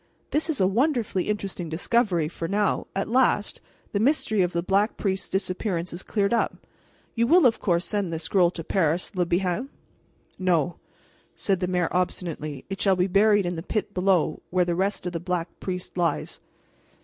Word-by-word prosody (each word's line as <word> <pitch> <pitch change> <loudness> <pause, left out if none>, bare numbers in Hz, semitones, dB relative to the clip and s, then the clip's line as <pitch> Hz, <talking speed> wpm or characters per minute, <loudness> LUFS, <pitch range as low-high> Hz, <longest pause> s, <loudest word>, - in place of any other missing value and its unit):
This 310 +2 0
is 310 - 0
a 190 - +4
wonderfully 225 - +1
interesting 195 -5 -3
discovery, 175 0 +1
for 165 +1 -5
now, 205 +2 0
at 195 - -1
last, 240 -4 +2 0.3
the 200 - 0
mystery 220 -4 +2
of 180 -1 +1
the 170 -1 -1
Black 200 +4 +1
Priest's 190 -1 -2
disappearance 185 -2 -2
is 175 - -5
cleared 200 +1 0
up. 235 - -1 0.5
You 235 0 +1
will, 345 +2 +6
of 235 -2 +4
course, 175 -2 +1
send 200 -2 -1
this 165 0 -3
scroll 180 -1 +3
to 170 -2 -6
Paris, 170 +1 0
Le 180 -2 +1
Bihan?" 185 +8 0 0.7
"No," 175 -2 +1 0.6
said 195 -3 0
the 180 - -1
mayor 180 -2 +1
obstinately, 165 -5 -2
"it 195 0 -5
shall 195 -2 +4
be 180 0 +2
buried 205 +1 +4
in 175 0 -2
the - - -3
pit 205 +3 -3
below 180 -4 +1
where 180 0 +2
the 175 - 0
rest 190 +2 -1
of 180 - -3
the 170 - -2
Black 175 -1 -2
Priest 180 -1 -5
lies." 175 -2 -1
185 Hz, 185 wpm, -25 LUFS, 175-205 Hz, 0.7 s, will